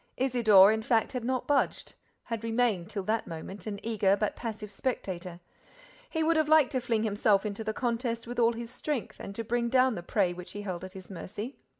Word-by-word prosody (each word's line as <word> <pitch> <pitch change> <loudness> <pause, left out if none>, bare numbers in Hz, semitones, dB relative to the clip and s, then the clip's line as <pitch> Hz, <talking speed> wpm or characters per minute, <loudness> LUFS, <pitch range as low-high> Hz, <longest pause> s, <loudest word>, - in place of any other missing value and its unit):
Isidore, 220 -6 +6
in 220 0 0
fact, 225 0 +1
had 250 -3 -4
not 255 +1 -1
budged, 290 -1 0 0.3
had 230 -2 -4
remained, 225 -6 +1
till 200 -2 -4
that 220 +3 -1
moment, 175 +5 -7
an 200 -2 -4
eager, 205 -3 +2
but 210 - 0
passive 215 -3 -6
spectator. 185 -7 -4 0.7
He 320 -1 0
would 325 +1 +3
have 310 -1 +2
liked 310 -4 +5
to 255 - 0
fling 230 -3 0
himself 205 -1 +2
into 210 +1 -3
the 220 - -1
contest 235 0 -2
with 245 +1 -5
all 235 0 +4
his 235 0 -7
strength 295 -7 -4
and 200 - -7
to 230 - -3
bring 235 +1 0
down 255 0 +4
the 175 - -5
prey 180 0 +1
which 180 0 -9
he 205 - -6
held 185 -3 -4
at 185 0 -8
his 190 0 -11
mercy. 210 +7 -7
225 Hz, 215 wpm, -29 LUFS, 200-245 Hz, 0.7 s, Isidore